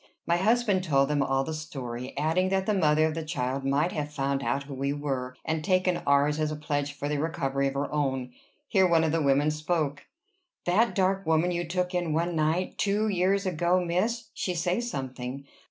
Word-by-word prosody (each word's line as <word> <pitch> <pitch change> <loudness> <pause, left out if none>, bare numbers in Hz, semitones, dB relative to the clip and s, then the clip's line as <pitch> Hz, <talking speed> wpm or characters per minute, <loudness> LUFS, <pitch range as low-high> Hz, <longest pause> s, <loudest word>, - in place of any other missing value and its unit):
My 170 - +2
husband 210 -1 +2
told 140 -5 +2
them 145 -1 +1
all 135 0 +1
the 160 - -4
story; 130 -5 -6
adding 165 +5 +1
that 190 0 +1
the 215 - +1
mother 155 -5 +3
of 160 - 0
the 165 0 -4
child 135 -4 -2
might 140 +6 +1
have 150 -1 -3
found 140 -1 -1
out 140 0 -1
who 140 0 -9
we 135 +1 -1
were, 135 -3 -3
and 160 -1 -1
taken 185 0 +2
ours 140 +2 +3
as 155 0 0
a - - -3
pledge 145 -1 -2
for 145 0 -4
the 145 0 -1
recovery 140 -3 0
of 135 - -3
her 140 +2 -2
own. 135 -4 -1 0.4
Here 190 -2 +4
one 165 -2 +4
of 160 - +1
the 165 0 +1
women 145 +1 +3
spoke. 155 -2 -2 0.6
"That 215 +7 +2
dark 195 -1 +1
woman 160 +2 +3
you 175 -1 -2
took 180 +1 -1
in 175 -3 0
one 170 +2 0
night 160 +4 0
two 210 +2 +1
years 195 +1 +1
ago, 175 0 +2
miss 195 +7 -1
she 180 - -2
say 175 +4 0
something. 135 - -5
155 Hz, 205 wpm, -27 LUFS, 140-180 Hz, 0.6 s, Here